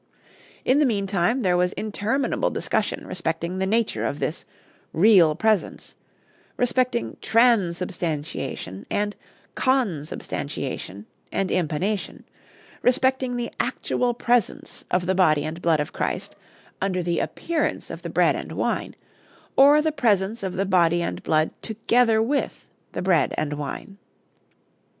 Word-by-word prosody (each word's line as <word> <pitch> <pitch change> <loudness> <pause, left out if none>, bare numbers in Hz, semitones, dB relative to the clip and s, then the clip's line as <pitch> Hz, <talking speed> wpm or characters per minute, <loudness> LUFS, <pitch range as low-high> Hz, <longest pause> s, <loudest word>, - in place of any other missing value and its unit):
In 260 +3 +4
the 300 - +4
mean 205 -5 0
time 195 +6 +1
there 180 -5 +2
was 180 0 +1
interminable 220 +5 -1
discussion - - -2
respecting 170 +1 -3
the 190 - 0
nature 225 +2 0
of 145 - -1
this 155 - -3 0.5
"real 175 -4 +6
presence," 220 0 0 0.6
respecting 250 -1 0
_tran_substantiation 175 - 0
and 205 0 -1 0.4
_con_substantiation 155 - -2 0.3
and 195 -1 -1
impanation, 180 +5 -1 0.6
respecting 260 0 +2
the 240 -1 -3
actual 245 -1 0
presence 240 -3 -1
of 180 0 +1
the 190 - +1
body 155 -6 +3
and 160 +2 -5
blood 165 -3 +3
of 150 - -3
Christ - - -3 0.5
under 185 -2 0
the 170 0 0
appearance 330 -2 -2
of - - -7
the - - -6
bread - - +3
and - - -6
wine, - - -2 0.6
or 290 +2 +7
the 315 - +1
presence 225 -6 +1
of 190 -2 -3
the 195 - -1
body 175 -2 +3
and - - -4
blood 155 0 +1
together 225 0 +2
with 280 +5 -2 0.3
the - - -3
bread 180 -4 +2
and 150 -1 -1
wine. 150 +7 -6
195 Hz, 130 wpm, -24 LUFS, 170-235 Hz, 0.6 s, or